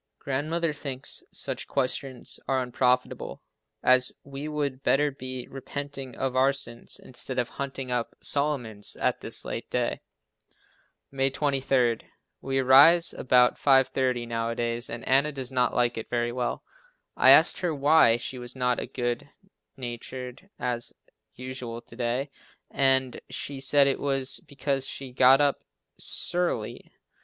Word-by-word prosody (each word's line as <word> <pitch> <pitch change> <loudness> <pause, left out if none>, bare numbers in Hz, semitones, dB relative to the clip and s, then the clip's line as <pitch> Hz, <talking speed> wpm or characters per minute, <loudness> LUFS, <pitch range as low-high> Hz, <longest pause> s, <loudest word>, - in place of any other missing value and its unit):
Grandmother 155 +4 -2
thinks 135 -3 -6
such - - -3
questions 130 -1 -2
are 130 -1 +1
unprofitable, 125 0 0 0.4
as 130 0 +6
we 140 +2 -7
would 145 -3 -3
better 145 +2 +2
be 130 -2 -7
repenting 135 0 -7
of 130 -1 -2
our 130 +1 +4
sins, 120 -4 -4
instead 130 +1 -6
of 120 -1 0
hunting 135 -2 -5
up 120 -1 -2
Solomon's 130 -8 0
at - - -1
this - - -1
late - - -5
day. - - -1 1.1
May 135 0 +1
23. 135 -4 +1 0.4
We 135 0 -2
arise 140 +6 +6
about 125 -1 +3
5:30 130 -3 +2
nowadays 115 +1 -2
and 115 0 -7
Anna 140 +3 +3
does 135 -3 -5
not 125 -1 +1
like 120 -1 +1
it 110 - -8
very 120 0 0
well. 125 0 -3 0.5
I - - +5
asked - - +7
her 175 -2 0
why 145 -4 +5
she 125 +2 -5
was 120 +1 -4
not 125 -1 0
as - - -6
good 120 +3 -2 0.5
natured 125 +5 -7
as 120 -1 -2 0.4
usual 125 -2 -6
to 115 - -14
day 125 +3 -2 0.4
and 130 -2 +2
she 140 -1 -4
said 140 +1 +4
it 140 - +1
was 135 -2 +1
because 135 -1 -2
she 135 -2 -6
got 130 +1 +6
up 145 -1 +1 0.4
"s'urly." 175 -11 -2
130 Hz, 140 wpm, -27 LUFS, 125-140 Hz, 1.1 s, asked